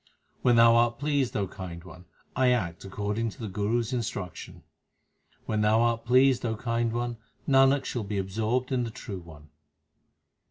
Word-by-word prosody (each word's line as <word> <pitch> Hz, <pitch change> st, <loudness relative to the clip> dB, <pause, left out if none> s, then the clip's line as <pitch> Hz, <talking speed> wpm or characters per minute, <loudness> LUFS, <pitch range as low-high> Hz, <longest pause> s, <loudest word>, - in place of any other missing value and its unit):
When 120 Hz, -1 st, +4 dB
Thou 115 Hz, 0 st, +7 dB
art 120 Hz, 0 st, +2 dB
pleased, 140 Hz, -3 st, 0 dB
O 100 Hz, -2 st, -1 dB
Kind 85 Hz, -2 st, -8 dB
One, 90 Hz, -1 st, -13 dB, 0.3 s
I 130 Hz, -1 st, +3 dB
act 95 Hz, -9 st, -1 dB
according 105 Hz, +3 st, -2 dB
to 125 Hz, -, -13 dB
the 110 Hz, -, -4 dB
Guru 105 Hz, +4 st, 0 dB
s 115 Hz, +2 st, -5 dB
instruction. 105 Hz, -6 st, -5 dB, 0.8 s
When 110 Hz, -1 st, -1 dB
Thou 105 Hz, +1 st, +3 dB
art 115 Hz, -1 st, +1 dB
pleased, 130 Hz, +1 st, +4 dB
O 115 Hz, -2 st, -1 dB
Kind 115 Hz, +1 st, -1 dB
One, 120 Hz, 0 st, -3 dB, 0.3 s
Nanak 135 Hz, 0 st, +4 dB
shall 120 Hz, -, -3 dB
be 100 Hz, 0 st, -4 dB
absorbed 110 Hz, +7 st, -1 dB
in 125 Hz, -2 st, +1 dB
the 115 Hz, -, -3 dB
True 110 Hz, -4 st, -7 dB
One. 80 Hz, -3 st, -14 dB
115 Hz, 170 wpm, -27 LUFS, 100-125 Hz, 0.8 s, Thou